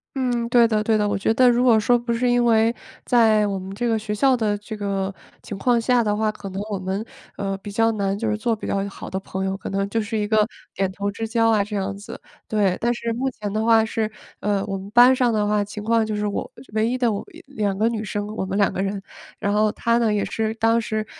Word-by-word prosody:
嗯， 245 Hz, -3 st, -1 dB
对 235 Hz, -1 st, +5 dB
的 215 Hz, -1 st, +1 dB
对 220 Hz, 0 st, +2 dB
的。 210 Hz, -1 st, +1 dB
我 205 Hz, -, 0 dB
觉 200 Hz, -, +1 dB
得 255 Hz, 0 st, +6 dB
如 240 Hz, +1 st, +3 dB
果 235 Hz, -3 st, +5 dB
说 240 Hz, +3 st, +3 dB
不 240 Hz, 0 st, -4 dB
是 235 Hz, +2 st, +1 dB
因 245 Hz, 0 st, +3 dB
为， 225 Hz, 0 st, +3 dB, 0.3 s
在 220 Hz, -3 st, +4 dB
我 200 Hz, -1 st, -2 dB
们 190 Hz, +1 st, -7 dB
这 240 Hz, +3 st, -1 dB
个 225 Hz, -1 st, +2 dB
学 210 Hz, 0 st, -4 dB
校 260 Hz, +5 st, +3 dB
的 215 Hz, -3 st, 0 dB
这 210 Hz, +2 st, -8 dB
个 200 Hz, -2 st, -2 dB, 0.3 s
情 205 Hz, -, -6 dB
况 240 Hz, +4 st, +2 dB
下 240 Hz, +1 st, +2 dB
的 210 Hz, -1 st, 0 dB
话， 215 Hz, 0 st, +1 dB
可 200 Hz, -2 st, -9 dB
能 190 Hz, +1 st, -5 dB
我 200 Hz, -, -2 dB
们， 190 Hz, +3 st, -3 dB, 0.3 s
呃， 195 Hz, -1 st, -2 dB
比 205 Hz, -, -8 dB
较 225 Hz, +2 st, +2 dB
难 200 Hz, -2 st, -1 dB
就 225 Hz, +2 st, -2 dB
是 215 Hz, -, +1 dB
做 225 Hz, +2 st, 0 dB
比 210 Hz, -, -8 dB
较 195 Hz, -, 0 dB
一 -, -, -4 dB
好 200 Hz, -, -9 dB
的 190 Hz, -, -3 dB
朋 190 Hz, 0 st, -4 dB
友， 190 Hz, 0 st, -1 dB
可 195 Hz, -, -7 dB
能 195 Hz, 0 st, -1 dB
就 225 Hz, +3 st, -1 dB
是 215 Hz, +1 st, -3 dB
一 210 Hz, -1 st, -1 dB
个 215 Hz, 0 st, +3 dB, 0.3 s
点 190 Hz, -1 st, -1 dB
头 200 Hz, +1 st, -2 dB
之 225 Hz, +2 st, -4 dB
交 225 Hz, 0 st, +2 dB
啊 210 Hz, -2 st, +3 dB
这 210 Hz, +1 st, -6 dB
样 200 Hz, 0 st, -2 dB
子， 200 Hz, +1 st, -9 dB, 0.3 s
对。 200 Hz, -4 st, +1 dB
但 235 Hz, +1 st, +2 dB
是 235 Hz, -1 st, -3 dB
目 260 Hz, +3 st, -1 dB
前 210 Hz, -5 st, -6 dB
的 215 Hz, +1 st, 0 dB
话 225 Hz, -1 st, +5 dB
是， 220 Hz, -1 st, -2 dB, 0.3 s
呃， 200 Hz, -1 st, 0 dB
我 195 Hz, -1 st, -3 dB
们 195 Hz, +1 st, -9 dB
班 245 Hz, +3 st, +7 dB
上 250 Hz, -2 st, +2 dB
的 210 Hz, -2 st, +1 dB
话 210 Hz, 0 st, +2 dB
情 205 Hz, +1 st, -7 dB
况 230 Hz, +1 st, +2 dB
就 215 Hz, -1 st, -3 dB
是 210 Hz, 0 st, -1 dB
我 205 Hz, -, -3 dB, 0.2 s
唯 220 Hz, +1 st, +2 dB
一 255 Hz, -, -1 dB
的 245 Hz, -3 st, +2 dB
我 205 Hz, -, -3 dB, 0.2 s
两 210 Hz, -8 st, -2 dB
个 220 Hz, +3 st, +2 dB
女 225 Hz, -2 st, -2 dB
生， 205 Hz, 0 st, -3 dB
我 190 Hz, -, -2 dB
们 190 Hz, +1 st, -3 dB
两 200 Hz, -, +2 dB
个 -, -, -2 dB
人。 195 Hz, 0 st, -2 dB, 0.4 s
然 200 Hz, -, -1 dB
后 215 Hz, 0 st, +3 dB
她 235 Hz, 0 st, +1 dB
呢 230 Hz, -2 st, +2 dB
也 210 Hz, -1 st, 0 dB
是 220 Hz, 0 st, -2 dB
当 225 Hz, +1 st, +2 dB
时， 215 Hz, -1 st, -2 dB
215 Hz, 290 characters per minute, -22 LUFS, 200-230 Hz, 0.4 s, 班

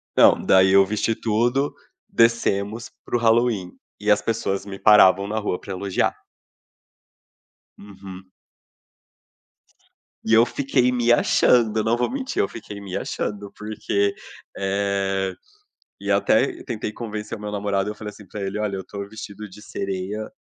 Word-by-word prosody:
Não, -, -, +6 dB
daí 95 Hz, 0 st, +5 dB
eu 100 Hz, 0 st, +7 dB
vesti 110 Hz, +2 st, 0 dB
tudo, 120 Hz, +6 st, 0 dB, 0.4 s
descemos 115 Hz, -1 st, +1 dB, 0.2 s
para -, -, -3 dB
o -, -, -3 dB
Halloween, 115 Hz, -5 st, +2 dB, 0.3 s
e 105 Hz, 0 st, -2 dB
as 105 Hz, -, +4 dB
pessoas 105 Hz, -4 st, -2 dB
me 95 Hz, -1 st, -8 dB
paravam 100 Hz, -2 st, +6 dB
na 110 Hz, +1 st, -3 dB
rua 105 Hz, -4 st, -2 dB
para 100 Hz, -, -7 dB
elogiar. 95 Hz, 0 st, -1 dB, 1.6 s
Uhum. 95 Hz, -2 st, -11 dB, 2.0 s
E 110 Hz, -, +1 dB
eu 115 Hz, +1 st, +7 dB
fiquei 130 Hz, -1 st, +1 dB
me 120 Hz, -1 st, +2 dB
achando, 120 Hz, -2 st, +3 dB
eu -, -, +1 dB
não 115 Hz, +2 st, +2 dB
vou 120 Hz, -, 0 dB
mentir, 270 Hz, 0 st, -2 dB
eu -, -, +1 dB
fiquei 105 Hz, -3 st, -9 dB
me 95 Hz, -2 st, -6 dB
achando 100 Hz, -1 st, -4 dB
porque, 100 Hz, -1 st, -1 dB, 0.4 s
eh 95 Hz, -1 st, -1 dB, 0.7 s
e -, -, -5 dB
até 370 Hz, -3 st, +2 dB
tentei 110 Hz, -4 st, -4 dB
convencer 110 Hz, -1 st, -6 dB
o -, -, -13 dB
meu 105 Hz, 0 st, -5 dB
namorado, 100 Hz, -1 st, -1 dB
eu 105 Hz, -, -5 dB
falei 105 Hz, -1 st, -7 dB
assim 105 Hz, 0 st, -14 dB
pra 105 Hz, -, -8 dB
ele: 100 Hz, +1 st, -3 dB
"Olha, 105 Hz, -2 st, -2 dB
eu -, -, -4 dB
estou 100 Hz, +1 st, -7 dB
vestido 105 Hz, -1 st, -9 dB
de 100 Hz, +3 st, -14 dB
sereia, 100 Hz, +1 st, -4 dB
105 Hz, 150 wpm, -23 LUFS, 100-115 Hz, 2.0 s, eu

